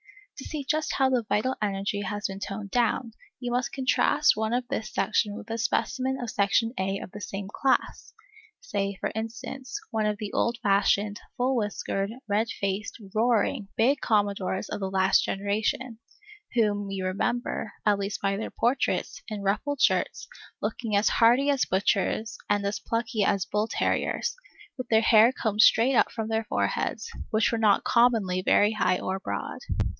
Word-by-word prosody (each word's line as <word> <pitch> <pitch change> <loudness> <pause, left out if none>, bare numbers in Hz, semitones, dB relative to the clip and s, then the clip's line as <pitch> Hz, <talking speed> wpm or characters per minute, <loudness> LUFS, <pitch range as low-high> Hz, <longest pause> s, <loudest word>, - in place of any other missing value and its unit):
To - - -7
see 305 -3 -4
just 310 +1 0
how 265 -1 +3
the 250 -2 +2
vital 255 +5 +1
energy 200 0 -1
has 205 +1 -4
been 195 0 -3
toned 200 0 -6
down, 240 0 +1 0.3
you 245 -1 -4
must 250 +2 0
contrast 275 +2 +3
one 220 +1 -1
of 245 0 -1
this 215 -2 -3
section 205 -2 0
with 225 - -9
a 225 - -2
specimen 260 +3 0
of 240 -3 -4
Section 215 +3 +2
A 195 +1 0
of 190 - -8
the 210 - -9
same 195 -1 -5
class, 265 +6 -1 0.5
say, 200 - -2
for - - -2
instance, 240 +4 -5
one 220 -2 0
of 210 -1 -1
the 210 -2 -6
old 235 0 +1
fashioned, 205 +1 +2 0.2
full 255 +2 +1
whiskered, 205 -3 -2 0.2
red 210 +2 +1
faced, 200 +3 -3
roaring, 225 0 +1
big 270 +5 +3
Commodores 200 -3 0
of - - -4
the 190 -1 -2
last 190 0 +3
generation, 215 +4 -2 0.6
whom 205 -3 +1
you 195 -1 -3
remember, 225 +4 -2
at 205 -1 +3
least 200 +1 -3
by 195 0 0
their 220 - -4
portraits, 245 +4 0
in 210 -3 -5
ruffled 260 +8 -1
shirts, - - +1 0.3
looking 225 -4 -2
as 200 +2 +3
hearty 245 +5 +4
as 275 -2 +1
butchers 205 +3 0
and 205 -1 +1
as 200 +1 -1
plucky 230 -1 -1
as 195 -1 +1
bull 210 +1 -1
terriers, - - -1 0.4
with 255 -3 -6
their 220 -1 +5
hair 225 +1 +6
combed 215 -4 0
straight 230 +5 +5
up - - +3
from 220 -2 -4
their 225 0 0
foreheads, 100 - -1 0.2
which 220 0 +2
were 230 - -1
not 210 -3 +4
commonly 225 -7 +3
very 205 +2 +4
high 185 -4 +1
or 190 +1 -3
broad. - - -4
215 Hz, 170 wpm, -27 LUFS, 200-240 Hz, 0.6 s, hair